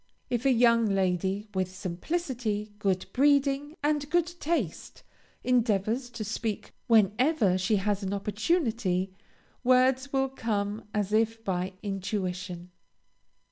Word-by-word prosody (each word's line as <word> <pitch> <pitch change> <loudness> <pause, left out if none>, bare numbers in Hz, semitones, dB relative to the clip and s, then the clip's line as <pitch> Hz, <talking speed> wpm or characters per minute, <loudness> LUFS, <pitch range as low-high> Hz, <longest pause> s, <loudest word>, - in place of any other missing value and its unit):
If 245 +2 +1
a - - +5
young 235 -2 +4
lady, 190 +1 0
with 185 -1 -2
simplicity, 215 - -3
good 190 -3 0
breeding, 280 +2 +2
and 295 -1 0
good 345 +1 +3
taste, 290 - -2 0.4
endeavors 235 0 +1
to 235 -3 -6
speak 215 0 -4
whenever 220 - +3
she 185 +4 +2
has 205 0 0
an 190 -1 -3
opportunity, 210 - 0 0.5
words 255 +2 +3
will 270 -1 +1
come 210 -4 -2
as 210 -1 -1
if 225 +1 +1
by 185 -1 -2
intuition. 185 -3 -4
215 Hz, 115 wpm, -28 LUFS, 195-255 Hz, 0.5 s, a